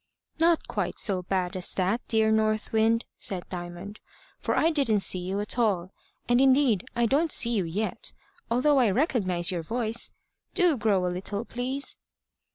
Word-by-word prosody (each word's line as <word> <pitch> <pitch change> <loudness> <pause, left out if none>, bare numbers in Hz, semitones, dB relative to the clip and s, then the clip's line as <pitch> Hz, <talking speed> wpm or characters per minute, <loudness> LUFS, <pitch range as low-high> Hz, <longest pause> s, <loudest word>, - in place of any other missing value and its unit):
"Not 330 0 +3
quite - - -3
so 190 -3 +3
bad 185 0 -2
as 185 -1 -4
that, 190 +5 0
dear 220 -1 +2
North 215 0 +1
Wind," 225 +1 +2
said 185 -3 -4
Diamond, 175 +3 -7 0.4
"for - - -1
I 325 - +3
didn't 265 -10 +2
see 185 - +2
you 185 +3 -3
at 210 +4 -2
all, 190 -6 +1 0.4
and 240 +1 +3
indeed 265 -6 +3
I 235 0 +2
don't 290 +7 +1
see 235 -3 +4
you 205 -6 0
yet, 200 +7 -3 0.4
although 265 +4 +3
I 240 -4 +4
recognise 190 - +1
your 175 -2 -2
voice. 225 +5 -1 0.4
Do 355 -5 +4
grow 205 -6 +1
a 180 - -1
little, 200 +4 -4
please." 255 +4 -4
220 Hz, 165 wpm, -27 LUFS, 185-245 Hz, 0.4 s, see